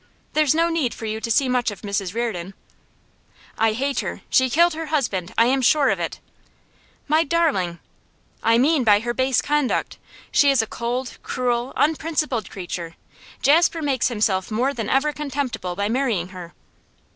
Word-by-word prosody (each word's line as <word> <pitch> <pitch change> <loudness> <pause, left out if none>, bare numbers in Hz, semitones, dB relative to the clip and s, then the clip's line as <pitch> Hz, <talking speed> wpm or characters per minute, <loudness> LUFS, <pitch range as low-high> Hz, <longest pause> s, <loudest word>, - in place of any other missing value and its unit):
There's 310 -1 +3
no 335 +1 +2
need 320 -8 -1
for 225 - -7
you 220 0 -3
to 230 - -4
see 260 +4 +3
much 250 -2 +1
of 205 - -9
Mrs 200 -1 -3
Reardon 195 -6 -3 0.5
' - - -30
'I 225 -1 +3
hate 275 +4 -1
her! - - -4
She 260 0 +4
killed 340 +6 +4
her 320 0 -5
husband; 225 - -1
I 230 - +6
am 265 +2 +2
sure 280 +3 +4
of - - -1
it.' - - -4 0.9
'My 310 +2 +3
darling!' 280 - 0 0.6
'I 230 0 +3
mean 280 +2 +3
by 210 -2 +5
her 240 +1 -2
base 260 0 +1
conduct. 295 -2 -1 0.3
She 285 - +4
is 275 -2 +3
a - - -3
cold, 240 +3 -4
cruel, 245 0 -1
unprincipled 305 -6 0
creature! 175 -3 -6 0.5
Jasper 325 +3 +4
makes 270 -4 +1
himself 210 -5 0
more 245 +6 0
than 225 -5 -4
ever 295 +3 +2
contemptible 275 -11 -3
by 200 +2 -1
marrying 225 -7 0
her. 180 -2 -10
250 Hz, 170 wpm, -22 LUFS, 215-290 Hz, 0.9 s, I